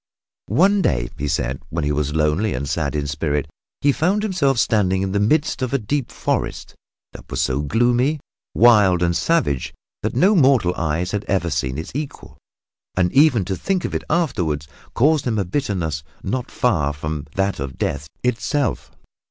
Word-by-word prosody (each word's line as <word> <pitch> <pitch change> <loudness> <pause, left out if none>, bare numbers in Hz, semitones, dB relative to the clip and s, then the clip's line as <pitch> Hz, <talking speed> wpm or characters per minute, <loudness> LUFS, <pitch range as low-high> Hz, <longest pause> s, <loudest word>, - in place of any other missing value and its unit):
One 190 - +3
day, - - 0
he 75 - -3
said, 65 -2 -1
when 85 -1 -2
he 75 - 0
was 75 0 -1
lonely 80 +7 +1
and 70 +3 -3
sad 75 0 -1
in 75 -1 -1
spirit, 75 -1 -1 0.3
he 145 - +4
found 185 +9 +1
himself 165 - +1
standing 95 -5 +2
in 95 - -2
the 100 - +1
midst 145 +8 +1
of 130 0 -2
a - - +4
deep 130 +3 -2
forest - - -2 0.4
that - - -12
was - - -3
so 65 +2 +1
gloomy, 120 - +2 0.4
wild 105 -7 +5
and 85 0 +1
savage 155 - 0 0.3
that - - -2
no 190 - +4
mortal 130 - +4
eyes 85 +3 -1
had 105 0 -2
ever 90 -4 0
seen 65 -2 -1
its 80 - -6
equal 145 +1 -6 0.6
and 90 -1 +2
even 135 - +4
to 95 +1 -2
think 185 - -1
of - - -4
it - - -2
afterward 90 - 0 0.3
caused 145 +2 +3
him 115 -3 0
a 100 - 0
bitterness 90 - -2 0.2
not 120 +5 -3
far 80 - +1
from 75 0 -5
that 95 +1 0
of 65 -2 -5
death 75 - -2 0.2
itself. 125 +3 -1
95 Hz, 175 wpm, -21 LUFS, -, 0.6 s, wild